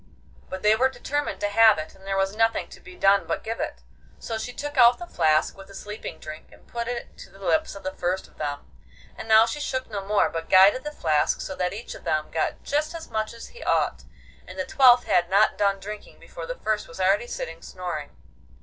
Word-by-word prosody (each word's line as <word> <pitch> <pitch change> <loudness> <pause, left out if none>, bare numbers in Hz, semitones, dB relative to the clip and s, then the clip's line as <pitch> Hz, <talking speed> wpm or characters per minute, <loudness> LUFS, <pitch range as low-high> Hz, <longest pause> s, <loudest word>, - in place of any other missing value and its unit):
But 190 0 -6
they 210 +1 +5
were 260 +4 +3
determined 290 +2 -3
to 205 - +1
have 220 0 +6
it, 155 0 -6
and 190 0 -17
there 195 0 -1
was 195 +1 0
nothing 225 0 +1
to - - -13
be 370 -2 -13
done 195 - +3
but - - -2
give 225 +1 -4
it; - - -4 0.3
so 225 -1 -5
she 245 - -5
took 290 +3 -6
out 240 -2 +7
the 350 - -7
flask 155 - +2
with 195 0 -12
the 195 - -13
sleeping 210 +2 -7
drink 155 0 -10
and - - -19
put 235 -1 -5
it 240 -1 -5
to - - -11
the - - -18
lips 310 +11 0
of 200 - -10
the 190 - -3
first 180 +1 -2
of - - -26
them; 145 -1 -3 0.5
and - - -8
now 220 0 +7
she 235 +6 -4
shook 260 -4 -3
no 200 -2 -3
more, 205 +1 +2
but 165 0 -5
guided 195 +7 +6
the 300 - -4
flask 155 - +1
so - - -5
that 180 -1 -1
each 215 +5 -7
of - - -12
them 155 0 -1
got 160 - -2
just 300 +3 -1
as 325 -5 -8
much 220 -1 -1
as 230 0 -10
he 485 - -14
ought, - - 0 0.4
and - - -10
the - - -2
twelfth 250 -3 +6
had 175 0 +2
not 200 +3 +4
done 200 -1 +1
drinking 210 +2 -9
before - - -9
the - - -4
first 215 -1 -1
was 165 - -12
already 195 +5 +2
sitting 165 -7 -6
snoring. 175 -5 -6
210 Hz, 240 wpm, -25 LUFS, 190-240 Hz, 0.5 s, out